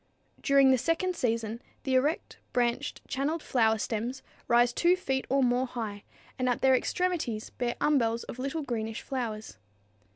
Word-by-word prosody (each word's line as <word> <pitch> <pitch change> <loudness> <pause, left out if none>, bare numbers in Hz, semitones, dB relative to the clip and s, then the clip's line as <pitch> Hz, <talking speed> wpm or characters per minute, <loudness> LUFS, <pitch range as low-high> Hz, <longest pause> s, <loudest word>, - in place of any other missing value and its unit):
During 275 -2 +5
the 260 - +4
second 355 +5 0
season 230 -2 -1 0.2
the 265 - -1
erect, 285 +5 +1 0.2
branched, 245 +4 0
channeled 295 +4 -1
flower 225 -3 +2
stems 230 +4 -3 0.2
rise 240 0 +4
2 345 +6 +4
feet 265 -7 -2
or 275 0 +3
more 250 +1 +2
high, 220 -5 -5 0.4
and 255 0 +1
at 245 - 0
their 265 0 +6
extremities 260 -5 -1
bear 240 -1 -2
umbels 235 -6 +2
of 255 - -8
little 275 +4 -2
greenish 225 -4 -3
flowers. 230 -5 -4
255 Hz, 155 wpm, -29 LUFS, 230-275 Hz, 0.4 s, their